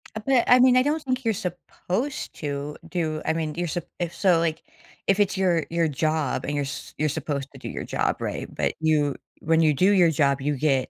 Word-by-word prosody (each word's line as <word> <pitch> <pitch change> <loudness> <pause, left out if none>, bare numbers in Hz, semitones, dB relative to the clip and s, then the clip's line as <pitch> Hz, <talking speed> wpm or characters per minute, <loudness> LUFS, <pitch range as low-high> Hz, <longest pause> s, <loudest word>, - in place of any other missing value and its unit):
Uh, - - -2
but, 265 -3 +4
I 250 - +7
mean, 255 0 +6
I 255 - +5
don't 300 +3 0
think 255 -2 -2
you're 225 - +2
supposed 190 - -4
to 145 0 -4
do 155 -3 -2
I - - +1
mean, 155 -2 -3
you're 175 0 -2
sup 170 +1 -3
if 170 -1 -2
so, 180 -4 +3
like, 165 -1 -1 0.4
if 195 +1 +3
it's 200 -1 +2
your 175 -5 +2
your 170 -1 +1
job, 155 -1 -1
and 145 - -2
you're 145 - 0
s 135 - -7
you're 155 0 +1
supposed 145 -2 -3
to - - -12
do - - -7
your - - -5
job, - - -1
right? - - -4
But, - - -1
you 150 -3 +2 0.3
when 160 +1 +3
you 155 -2 +4
do 185 +8 +3
your 180 -4 +5
job, 140 -2 +2
you 145 +2 0
get, 135 -2 +1
165 Hz, 230 wpm, -25 LUFS, 150-190 Hz, 0.4 s, I